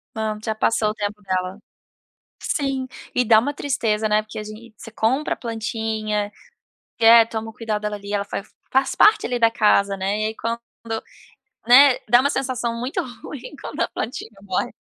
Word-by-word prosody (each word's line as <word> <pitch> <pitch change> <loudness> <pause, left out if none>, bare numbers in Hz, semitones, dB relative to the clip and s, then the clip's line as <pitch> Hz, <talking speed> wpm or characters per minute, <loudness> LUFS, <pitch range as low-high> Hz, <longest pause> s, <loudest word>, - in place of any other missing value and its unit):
Não, 220 -1 -2
já 220 -1 -2
passou 215 0 +1
o - - -2
tempo 210 0 -4
dela. 185 0 -2 0.8
Sim. 270 -3 -1 0.3
E 250 - +2
dá 220 -1 +6
uma 285 +6 0
tristeza, 220 -6 0
né, 210 0 +3
porque 215 0 -9
a - - -4
gente 215 +1 -11
você 225 - -11
compra 240 +7 0
a - - -20
plantinha, 220 -2 -3 0.7
e 225 - +2
é, 230 0 +9
toma 225 0 -5
o - - -12
cuidado 215 -2 -3
dali 205 0 -6
ela 200 0 0 0.5
faz 265 +1 +2
parte 430 +1 +5
ali 245 0 -1
da 230 -1 +4
casa, 200 -3 +3
né. 195 +3 -1
E - - 0
aí 220 - -5
quando 230 +1 -3 1.1
né, 265 +2 +8
dá 240 +2 +7
uma 280 - +1
sensação 250 -4 -2
muito 250 +3 -2 0.2
ruim 290 +1 -8
quando - - -5
a - - +2
plantinha 225 0 -5
morre. 190 -2 -2
220 Hz, 180 wpm, -22 LUFS, 210-240 Hz, 1.1 s, é